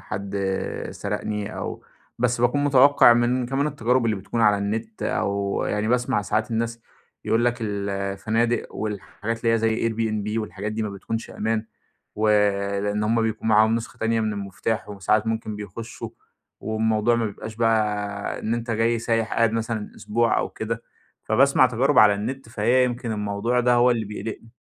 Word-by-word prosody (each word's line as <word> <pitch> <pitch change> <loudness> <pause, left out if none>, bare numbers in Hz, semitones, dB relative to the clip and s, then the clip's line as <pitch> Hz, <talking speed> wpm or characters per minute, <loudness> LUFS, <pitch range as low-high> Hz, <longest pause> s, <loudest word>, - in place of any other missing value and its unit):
حد 100 +3 -5 0.5
سرقني 105 0 -4
أو - - -5 0.4
بس 120 0 +1
باكون 145 +4 +2
متوقع 140 -2 +6
من 120 +1 +1
كمان 135 +3 0
التجارب 125 -3 +1
اللي 110 -3 +1
بتكون 100 +4 -3
على 105 -2 +4
النت، 110 +2 -3
أو 100 0 -1
يعني 105 +1 -1
باسمع 125 -2 +1
ساعات 110 +3 -1
الناس 115 +1 -2 0.4
يقول 115 +1 +2
لك 120 0 +2
الفنادق 100 +3 -1
والحاجات 110 +2 -4
اللي 115 - +4
هي - - +2
زي 115 +1 +1
Airbnb 110 -1 -2
والحاجات 105 0 -5
دي 110 +1 -2
ما 105 - -3
بتكونش 110 +3 -5
أمان، 110 0 -2 0.5
ولإن 105 -1 +1
هم 115 +2 +2
بيكون 110 0 -2
معاهم 110 +1 +5
نسخة 115 0 -5
تانية 115 0 +1
من 110 -1 0
المفتاح 100 +2 -3
وساعات 105 +2 0
ممكن 110 -1 -2
بيخشوا، 105 +3 -7 0.5
والموضوع 110 +1 +1
ما 115 -1 0
بيبقاش 110 +2 -7
بقى 105 -3 0
إن 115 +2 -1
أنتَ 120 0 -4
جاي 115 +1 +1
سايح 115 -1 -1
قاعد 115 -1 +3
مثلًا 115 -1 -2
أسبوع 115 +2 +1
أو - - -1
كده. 115 +1 -4 0.4
فباسمع 130 +3 +4
تجارب 130 +4 +2
على 105 -1 +7
النت، 115 +4 -5
فهي 120 +3 +2
يمكن 120 -2 -2
الموضوع 105 +4 0
ده 125 0 +3
هو 120 +1 +5
اللي 115 -2 0
بيقلقني 110 +2 -7
110 Hz, 160 wpm, -24 LUFS, 105-115 Hz, 0.5 s, على